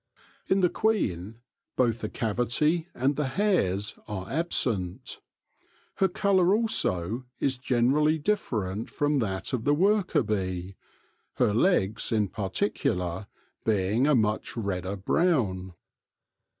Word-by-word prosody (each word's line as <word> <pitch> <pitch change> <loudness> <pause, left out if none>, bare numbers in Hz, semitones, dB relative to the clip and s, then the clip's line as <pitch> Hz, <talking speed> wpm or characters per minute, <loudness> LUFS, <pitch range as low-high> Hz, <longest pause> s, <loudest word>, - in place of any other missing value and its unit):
In 190 0 +2
the 180 - +4
queen 115 - -1 0.3
both 120 -3 +1
the 110 - -4
cavity 125 - 0
and 135 +3 +1
the 150 -1 -1
hairs 130 - 0
are 95 -3 -5
absent. 115 - -1 0.8
Her 195 - +4
colour 190 0 +3
also 120 - 0
is 135 -1 +1
generally 135 +5 +2
different 115 - -2
from 145 -1 0
that 95 -2 -3
of 120 -3 -1
the 145 +2 +3
worker 190 -2 +2
bee, 95 -3 -3 0.6
her 105 - +2
legs, 110 - +1
in 105 -3 +1
particular, 95 - -2 0.4
being 105 +5 +1
a 150 - +4
much 110 0 0
redder 100 -3 -2
brown. 95 - 0
120 Hz, 115 wpm, -27 LUFS, 95-155 Hz, 0.8 s, the